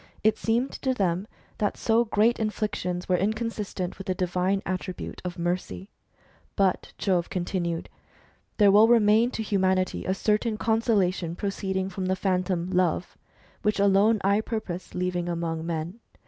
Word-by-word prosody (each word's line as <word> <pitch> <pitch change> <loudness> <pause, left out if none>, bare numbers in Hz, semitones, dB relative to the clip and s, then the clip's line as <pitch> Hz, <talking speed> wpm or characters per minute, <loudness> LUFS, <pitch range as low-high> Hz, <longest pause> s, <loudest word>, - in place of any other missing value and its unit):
It 215 0 +4
seemed 235 +5 0
to 260 -1 0
them 190 -1 0 0.3
that 205 - 0
so 230 +1 +2
great 220 +2 +2
inflictions 210 -5 -2
were 180 - +3
inconsistent 210 -3 -2
with 195 - -8
the 185 - 0
divine 185 +2 0
attribute 185 -1 -5
of 180 -1 -5
mercy. 170 - -3 0.7
But 195 -2 +1
Jove 180 -4 0
continued: 175 -2 -2 0.4
" - - -36
There 205 -2 +6
will 210 +3 +7
remain 225 0 +5
to 225 - -4
humanity"^ 190 -3 0
a 190 - +2
certain 215 +2 0
consolation 200 -7 +1
proceeding 190 -1 -2
from 185 -1 -4
the 190 - +1
Phantom 185 -2 -1
Love, 180 -1 0 0.5
which 210 -1 0
alone 200 +2 +4
I 200 +2 +3
purpose 195 -6 -5
leaving 180 -1 -1
among 165 -1 -3
men. 170 +5 -4
190 Hz, 145 wpm, -26 LUFS, 180-215 Hz, 0.7 s, will